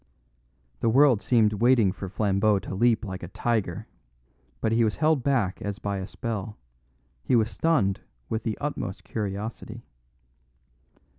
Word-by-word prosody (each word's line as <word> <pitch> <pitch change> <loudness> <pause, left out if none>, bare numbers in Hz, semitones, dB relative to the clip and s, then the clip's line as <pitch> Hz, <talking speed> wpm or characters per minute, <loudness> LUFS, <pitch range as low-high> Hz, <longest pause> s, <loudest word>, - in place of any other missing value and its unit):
The 115 - +1
world 130 -2 +5
seemed 110 -4 +3
waiting 115 -2 +4
for 95 0 -7
Flambeau 100 +1 +2
to 95 - -6
leap 115 +2 +2
like 95 -1 -6
a 90 - -6
tiger. 105 -2 -2 0.7
But 110 - 0
he 115 +1 +3
was 110 -2 +1
held 155 -3 +2
back 120 -8 0
as 100 -1 -4
by 100 -1 -3
a 95 - -5
spell; 110 -2 -5 0.7
he - - +2
was 115 0 +2
stunned 110 -13 +1 0.3
with 110 - -2
the 110 -1 -3
utmost 145 -10 -4
curiosity. 110 +2 -5
110 Hz, 145 wpm, -26 LUFS, 100-120 Hz, 0.7 s, world